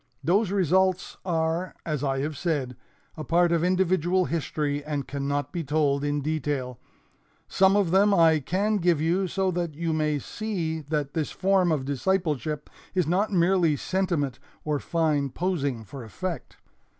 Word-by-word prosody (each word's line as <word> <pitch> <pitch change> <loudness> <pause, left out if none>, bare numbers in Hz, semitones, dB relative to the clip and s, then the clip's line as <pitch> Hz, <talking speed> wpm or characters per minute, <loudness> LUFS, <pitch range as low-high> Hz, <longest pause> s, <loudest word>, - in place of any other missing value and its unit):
Those 200 +4 +2
results 190 0 +1
are, 165 0 -1
as 150 -4 -2
I 135 -1 0
have 150 +2 -3
said, 140 -6 -2 0.4
a 155 - -6
part 170 +2 +3
of 170 -1 +2
individual 185 0 +2
history 145 -2 -2
and 145 -2 -3
cannot 140 0 -2
be 170 - -3
told 145 -1 +1
in 145 0 0
detail. 145 -5 -2 0.7
Some 190 +1 +4
of 200 -5 +2
them 200 +2 +5
I 165 -4 +5
can 200 +9 0
give 175 -4 +2
you 175 +5 +1
so 190 +1 0
that 170 -3 -3
you 165 +1 -1
may 155 -1 +1
see 165 - -3
that 145 -1 -3
this 155 -3 -1
form 190 -2 +2
of 145 -4 0
discipleship 150 0 -1 0.3
is 180 -3 +2
not 190 +7 +1
merely 175 -3 +3
sentiment 165 -7 -1 0.3
or 150 -2 0
fine 155 -4 0
posing 140 -7 -2
for 125 +5 -9
effect. 165 - -6
160 Hz, 155 wpm, -26 LUFS, 145-185 Hz, 0.7 s, them